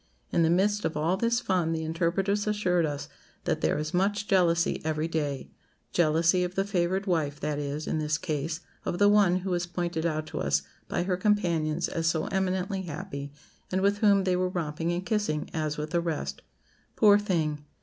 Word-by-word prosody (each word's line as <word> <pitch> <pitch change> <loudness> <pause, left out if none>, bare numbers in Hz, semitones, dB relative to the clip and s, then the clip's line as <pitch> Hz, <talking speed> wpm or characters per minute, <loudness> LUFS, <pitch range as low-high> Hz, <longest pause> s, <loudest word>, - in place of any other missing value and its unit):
In - - +2
the 165 - +4
midst 205 +4 +2
of 155 - -1
all 160 +4 +1
this 235 +4 +1
fun, 180 -8 0
the 160 0 -2
interpreters 185 +6 0
assured 180 -6 +2
us 145 -1 -4 0.4
that - - -1
'there - - +1
is 150 0 -3
much 200 +3 +1
jealousy 170 -3 +2
every 155 0 -1
day;' 145 -4 -3 0.4
jealousy 165 +2 +3
of 180 +1 -4
the 195 - +2
favoured 190 0 0
wife; 155 -6 0
that 150 -1 -2
is, 145 +1 -3
in 155 - -1
this 150 0 0
case, 160 -1 -3 0.2
of 175 - -2
the 205 - +5
one 200 -3 +4
who 190 - -1
was 175 0 0
pointed 175 -2 -2
out 155 -1 -2
to - - -5
us 70 0 +1 0.2
by - - -1
her 180 0 0
companions 175 -5 +1
as 165 0 -1
so 160 -1 +1
eminently 190 0 0
happy, 155 -4 -6 0.4
and 185 +1 +1
with 200 +1 +2
whom 200 -2 +4
they 185 -1 +2
were 185 0 +1
romping 165 -1 -2
and 175 +2 -2
kissing, 205 -9 -1
as 155 -2 -2
with 150 +1 -4
the 170 - +2
rest. 165 -3 -3 0.5
Poor 205 -2 +6
thing! 160 -7 -1
175 Hz, 195 wpm, -28 LUFS, 155-190 Hz, 0.5 s, Poor